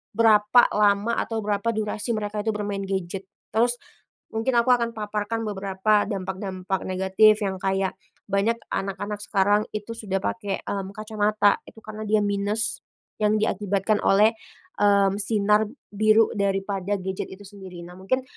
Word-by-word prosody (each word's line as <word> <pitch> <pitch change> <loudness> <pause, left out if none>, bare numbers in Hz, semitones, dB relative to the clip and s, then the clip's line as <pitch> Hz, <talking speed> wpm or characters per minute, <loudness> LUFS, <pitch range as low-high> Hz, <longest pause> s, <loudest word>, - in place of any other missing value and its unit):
berapa 220 +1 +6
lama 210 +2 +2
atau 225 -1 -3
berapa 210 +2 0
durasi 215 +1 -2
mereka 210 -1 -3
itu 220 - +1
bermain 205 -1 -3
gadget. 190 0 -3 0.2
Terus, 240 +2 +2 0.5
mungkin 225 +3 -1
aku 235 - -2
akan 235 -1 +1
paparkan 210 +1 -3
beberapa 200 +1 +1
dampak-dampak 190 -1 -3
negatif 190 +3 +4
yang 195 -2 -1
kayak 195 -1 0 0.3
banyak 205 +4 +1 0.2
anak-anak 200 +2 -3
sekarang 205 +1 +2
itu 215 +2 -5
sudah 195 -4 -2
pakai, 200 0 -3
mmm, 195 -1 -3
kacamata 215 -1 +1
itu - - -22
karena 215 0 -7
dia 215 0 +2
minus 205 +3 -1 0.4
yang 215 0 +3
diakibatkan 205 0 0
oleh, 210 +3 +5 0.5
mmm, 200 -1 +4
sinar 210 0 +2 0.2
biru 215 +2 +4
daripada 195 0 -1
gadget 190 0 -4
itu 190 +2 -11
sendiri. 190 -3 -10
Nah 175 - -11
mungkin, 255 +8 0
205 Hz, 140 wpm, -24 LUFS, 195-215 Hz, 0.5 s, berapa